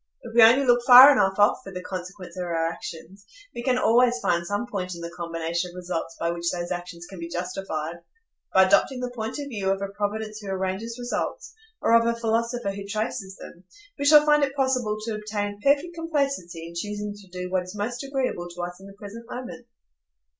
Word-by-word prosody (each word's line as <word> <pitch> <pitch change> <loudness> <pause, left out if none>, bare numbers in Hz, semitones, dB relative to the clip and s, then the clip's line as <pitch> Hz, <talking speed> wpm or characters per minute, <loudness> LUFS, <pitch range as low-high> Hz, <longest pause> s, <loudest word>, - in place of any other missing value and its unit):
If 235 - -9
we 235 - +6
only 240 +5 +7
look 245 -1 +4
far 255 +3 +11
enough 195 -8 +2
off 205 0 +4
for 195 - -9
the 180 -1 -7
consequence 180 -1 -7
of 180 - -3
our 165 -1 -1
actions, 175 +4 -9 0.3
we 235 - -5
can 250 0 +1
always 245 +1 +4
find 175 -6 0
some 205 +6 -2
point 185 -6 -4
in 170 - -9
the 170 0 -6
combination 170 0 -3
of 175 - -14
results 175 -2 -4
by 170 - 0
which 170 0 -2
those 175 -1 -4
actions 175 -1 -6
can 190 - -10
be 170 0 -6
justified; 175 -2 -4 0.5
by 190 - +6
adopting 250 +7 +3
the 250 0 -4
point 225 0 -5
of 285 -1 -5
view 200 -6 -2
of 195 0 +1
a 200 0 -4
Providence 210 +1 -3
who 205 - -10
arranges 190 +5 -3
results, 245 0 -4 0.3
or - - +3
of 230 0 +5
a 235 0 0
philosopher 230 -1 -1
who 200 0 -7
traces 215 -2 -3
them, 175 - -12 0.4
we 285 - -1
shall 300 0 +8
find 295 -1 +4
it 275 -1 -1
possible 255 -6 0
to 225 +1 -3
obtain 205 -1 -4
perfect 285 +6 +2
complacency 275 - -2
in 170 - -11
choosing 205 +3 -4
to 205 -1 -15
do 180 0 -6
what 185 -1 +1
is 180 +3 -9
most 240 +5 -3
agreeable 265 -10 -2
to 175 0 -7
us 175 +1 -6
in 195 - -12
the 200 - -12
present 225 +3 -10
moment. 250 -1 -8
205 Hz, 215 wpm, -25 LUFS, 180-240 Hz, 0.5 s, far